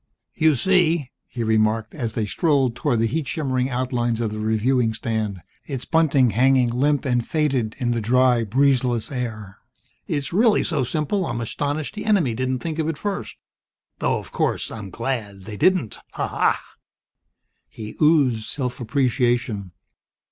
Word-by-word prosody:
"You 155 -2 +3
see," 170 -2 +2 0.2
he 120 - -4
remarked, 110 0 +1
as 120 -7 -4
they 110 - 0
strolled 135 - +1
toward 120 0 0
the - - +3
heat 145 +5 -2
shimmering 130 -5 -1
outlines 120 -2 -1
of 115 -2 -1
the 110 - -5
reviewing 110 +2 +1
stand, 110 -5 -3 0.2
its 135 -4 -4
bunting 145 -7 +3
hanging 125 +2 +3
limp 140 +4 +1
and 120 -2 +1
faded 135 -7 0
in 125 -3 -1
the 115 -1 -1
dry, 125 +1 +3
breezeless 125 +1 +1
air, 110 -6 -5 0.5
"it's 145 +1 -2
really 220 +3 +4
so 150 -6 0
simple 155 - -1
I'm 120 -2 -3
astonished 145 - -3
the 210 0 -6
enemy 190 - +2
didn't 130 +2 -2
think 160 -1 -3
of 155 - 0
it 160 - -3
first. 205 +2 -4 0.6
Though, - - +1
of - - -9
course, - - -1
I'm 105 -3 -7
glad 110 -3 -4
they 105 +3 -8
didn't 165 - +1
Ha! - - -2
ha!" - - +1 1.1
He 110 -1 -9
oozed 140 -8 +3
self 125 -3 -3
appreciation. 120 - 0
125 Hz, 155 wpm, -22 LUFS, 115-145 Hz, 1.1 s, really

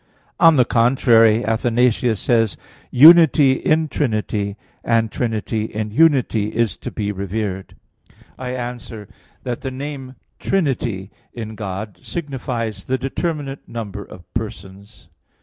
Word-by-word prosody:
On 165 -2 +7
the 125 -3 +4
contrary, 115 -2 +4
Athanasius 115 0 +1
says: 115 -4 +1 0.3
"Unity 155 -1 +7
in 155 +4 +1
Trinity; 105 -7 -2 0.3
and 115 -2 +1
Trinity 110 -2 -2
in 110 0 -4
Unity 130 -6 +3
is 115 -2 +1
to - - -6
be 105 -2 -3
revered." 100 0 -4 0.6
I 130 0 -5
answer 120 -4 -7 0.4
that, 120 -2 -4
The 135 - -3
name 135 0 -7 0.2
"Trinity" 120 - -1 0.2
in 110 -2 -6
God 100 0 -6
signifies 120 - -5
the 130 - 0
determinate 140 +1 -4
number 105 -3 -6
of 90 - -13
persons. 100 -2 -8
115 Hz, 115 wpm, -20 LUFS, 105-130 Hz, 0.6 s, On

